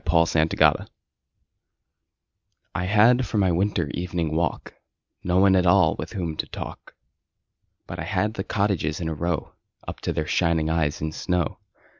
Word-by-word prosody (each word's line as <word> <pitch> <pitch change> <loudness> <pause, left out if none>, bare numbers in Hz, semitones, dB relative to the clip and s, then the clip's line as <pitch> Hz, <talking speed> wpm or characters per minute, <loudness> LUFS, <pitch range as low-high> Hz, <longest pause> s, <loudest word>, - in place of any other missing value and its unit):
Good 80 -1 +2
Hours - - +3 1.9
I 90 - -2
HAD 115 +6 +4
for 110 - -3
my 95 -3 +3
winter 85 -3 0
evening 85 -3 -2
walk 85 0 -2 0.5
No 90 0 +1
one 95 0 +5
at 90 -1 +3
all 85 - +4
with - - -6
whom 85 -5 -3
to - - -3
talk, - - -9 0.9
But - - -8
I - - -4
had 105 +3 -1
the 95 - -4
cottages 100 -8 -1
in 85 - -3
a 80 - -2
row 85 0 -3 0.3
Up - - -6
to - - -2
their 80 - -2
shining 80 -1 +1
eyes 80 -3 0
in 80 0 -2
snow. 90 0 -2
85 Hz, 160 wpm, -24 LUFS, 80-95 Hz, 1.9 s, one